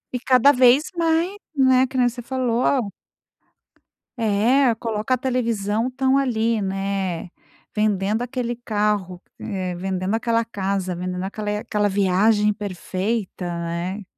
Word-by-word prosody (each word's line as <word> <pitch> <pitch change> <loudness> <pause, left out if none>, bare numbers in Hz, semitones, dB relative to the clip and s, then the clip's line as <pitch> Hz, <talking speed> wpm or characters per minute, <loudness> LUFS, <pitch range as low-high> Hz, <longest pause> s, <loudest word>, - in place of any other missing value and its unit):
E - - -1
cada 255 +2 +5
vez 255 +5 +4
mais, 335 +3 +1 0.2
né, 260 -1 +4
que 260 - -6
nem 245 - +4
você 245 +1 -4
falou 245 -2 0 1.3
É 230 +4 +3
coloca 225 +2 -1
a - - -6
televisão, 230 -3 -1
estão 265 +1 +1
ali, 230 -4 0
né. 195 -2 -2 0.5
Vendendo 210 0 +1
aquele 245 -1 -3
carro, 205 -5 -1 0.2
eh, 185 -3 -3
vendendo 185 +2 -2
aquela 230 0 +1
casa, 195 -4 -2
vendendo 180 +1 -4
aquela 210 +1 -3
aquela 205 -1 0
viagem 205 +2 +3
perfeita, 200 0 -3
né. 170 +3 -4
215 Hz, 125 wpm, -22 LUFS, 195-250 Hz, 1.3 s, cada